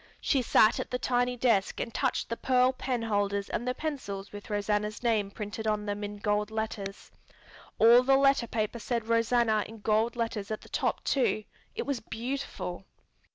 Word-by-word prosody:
She 270 - +2
sat 220 -1 +4
at - - -4
the 250 - -1
tiny 245 0 0
desk 230 -5 +2
and 230 - -4
touched 265 -3 0
the 230 - -1
pearl 255 +1 +3
penholders 205 -6 -1
and 240 - -2
the 250 - 0
pencils 230 -11 -5
with 205 +1 -9
Rosanna's 210 +1 -1
name 220 -4 +1
printed 210 +1 -5
on 210 -1 0
them 205 0 -3
in 205 0 -5
gold 210 0 0
letters. 220 -3 -5 0.7
All 235 +2 +7
the 270 +1 +4
letter 275 -3 +3
paper 220 +1 -2
said 230 0 -2
Rosanna 230 -1 +2
in 225 -1 -12
gold 220 +3 +1
letters 225 -4 -3
at 215 - -3
the - - -15
top - - -1
too; 250 -5 +1 0.3
it 465 - -3
was 280 -4 -1
beautiful. 225 -6 -5
225 Hz, 175 wpm, -29 LUFS, 210-245 Hz, 0.7 s, All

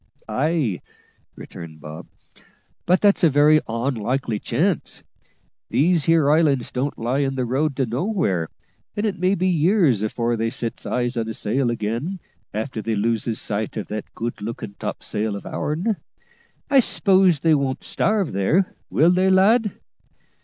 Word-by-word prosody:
"Ay," 130 - 0 0.5
returned 80 -3 -10
Bob, 75 +1 -9 0.8
"but 180 +2 +3
that's 200 -2 +3
a 165 - +7
very 150 +2 +5
onlikely 120 -1 -2
chance. 165 +9 -1 0.7
These 165 +1 +2
here 160 -3 +4
islands 150 -5 +2
don't 140 +3 -2
lie 120 +4 -1
in 135 -1 0
the 130 -1 -1
road 140 +4 0
to 135 - 0
nowhere, 120 - -1 0.5
and 205 - 0
it 195 -4 -2
may 185 +2 +2
be 185 0 0
years 170 - +3
afore 115 +2 -1
they 115 0 -1
sets 115 -1 -4
eyes 120 0 -1
on 115 -1 -1
a 110 - -5
sail 120 +4 0
again 120 - -3 0.3
after 110 +2 -4
they 110 +1 -2
loses 115 +1 -1
sight 105 +1 -3
of 110 - -5
that 105 0 -5
good 115 -2 -4
lookin' 105 -1 -6
topsail 105 -1 -3
of 100 - -8
ourn. 180 +8 -2 0.7
I 275 -1 +5
s'pose 190 - +3
they 165 -1 +4
won't 140 -3 -1
starve 210 -6 0
there, 150 - +1 0.2
will 165 +4 +4
they, 185 +1 +3
lad?" 210 +3 +4
135 Hz, 155 wpm, -22 LUFS, 115-175 Hz, 0.8 s, a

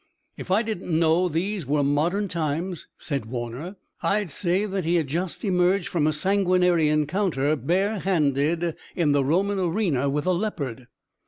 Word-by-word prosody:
"If - - -9
I 200 +5 +3
didn't 185 -7 -2
know 165 +2 +3
these 175 0 -2
were 145 +1 +2
modern 165 +9 +1
times," 170 +1 -3
said 140 -7 -3
Warner, 120 - -5 0.3
"I'd 205 -4 0
say 185 +4 0
that 195 -2 -2
he 170 +2 +1
had 165 -3 +2
just 170 - -3
emerged 180 0 +2
from 155 -4 +1
a - - +3
sanguinary 180 -2 +2
encounter 150 -1 +1
bare 190 - 0
handed 165 -1 +1 0.2
in 165 -5 +2
the 145 -1 +3
Roman 190 +8 +1
arena 170 -7 0
with 145 +1 -1
a 185 - +3
leopard." 140 - -3
170 Hz, 160 wpm, -25 LUFS, 150-190 Hz, 0.3 s, I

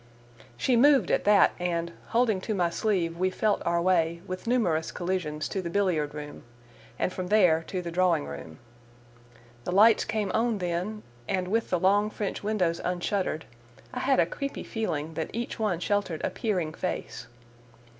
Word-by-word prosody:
She 250 - +2
moved 265 -4 +5
at - - +1
that, 205 -2 +6
and, 170 -1 -1 0.2
holding 230 -5 +2
to 215 +2 -2
my 175 -3 +1
sleeve, 170 -5 -1
we 185 +1 +2
felt 210 +2 0
our 170 0 +2
way, 170 -1 +1
with 185 +4 -6
numerous 175 -10 +1
collisions, 175 -5 -2
to 195 - -2
the 170 - -4
billiard 170 -6 0
room, 150 -1 -7 0.6
and 185 - -1
from 185 -1 -4
there 180 -6 +4
to 185 -2 -3
the 170 - -5
drawing 180 - +2
room. 70 +3 -8 1.1
The - - -3
lights 215 +4 +6
came 215 -2 -1
on 225 0 +1
then, 180 +4 -3 0.2
and, 185 -1 -1
with 225 +3 0
the 180 - +1
long 205 +4 +3
French 210 -2 -4
windows 185 -6 0
unshuttered, 180 -2 -1 0.5
I 250 - -3
had 265 +1 +2
a - - +5
creepy 280 -1 -5
feeling 160 -8 -3
that 160 0 -3
each 235 +2 -4
one 205 -6 0
sheltered 190 -4 -1
a - - 0
peering 180 -8 -1
face. - - -4
185 Hz, 170 wpm, -27 LUFS, 170-215 Hz, 1.1 s, that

